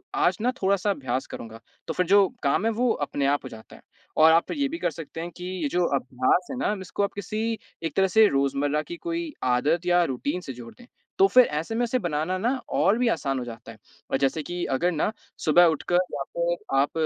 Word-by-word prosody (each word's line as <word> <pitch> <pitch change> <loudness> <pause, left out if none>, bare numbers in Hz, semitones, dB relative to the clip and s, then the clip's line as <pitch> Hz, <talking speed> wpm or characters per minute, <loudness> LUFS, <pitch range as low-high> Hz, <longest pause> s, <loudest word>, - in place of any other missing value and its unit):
आज 395 -1 +2
ना 245 +2 +2
थोड़ा-सा 200 +1 +1
अभ्यास 135 -8 -2
करूँगा। 115 -1 -9 0.3
तो 160 - -2
फ़िर 180 - 0
जो 200 +1 +6 0.2
काम 140 +9 +2
है 225 - +2
वो 240 +2 +1 0.2
अपने 140 - -2
आप 145 +1 +1
हो 130 - -7
जाता 110 -2 -12
है - - -16 0.4
और 160 +1 +7
आप 165 +1 +3
ये 285 -2 0
भी 320 +4 -5
कर - - 0
सकते 165 0 -8
हैं 170 +1 -6
कि 180 - -7 0.2
ये 150 - +1
जो 180 +5 +1
अभ्यास 130 +6 +1
है 260 - -4
ना 250 - 0
इसको 190 +2 -3
आप 200 - -1
किसी 215 +3 -3 0.3
एक 165 - -3
तरह 190 0 +4
से 215 +4 +5
रोज़मर्रा 140 0 0
की 345 - -8
कोई 335 -1 -4
आदत 145 +8 +1
या 175 0 +4
रूटीन 145 +4 -2
से 135 -7 -7
जोड़ 120 -1 -11
दें। 245 - -15 0.3
तो 390 - +6
फ़िर 255 -9 +6
ऐसे 155 +7 -3
में 240 - +1
इसे 245 +2 0
बनाना 170 0 -1
ना 220 +6 0 0.2
और 205 - +3
भी 245 0 +1
आसान 135 - -1
हो - - -4
जाता 115 -1 -9
है। 110 - -14 0.3
और - - +2
जैसे 135 +3 0
कि 175 +3 -4
अगर 175 +7 +1
ना 160 +5 0 0.3
सुबह 175 +3 +6
उठकर 175 +3 0 0.2
या 140 - -2
फ़िर 170 -5 -1
आप 140 - +2
175 Hz, 235 wpm, -25 LUFS, 140-210 Hz, 0.4 s, और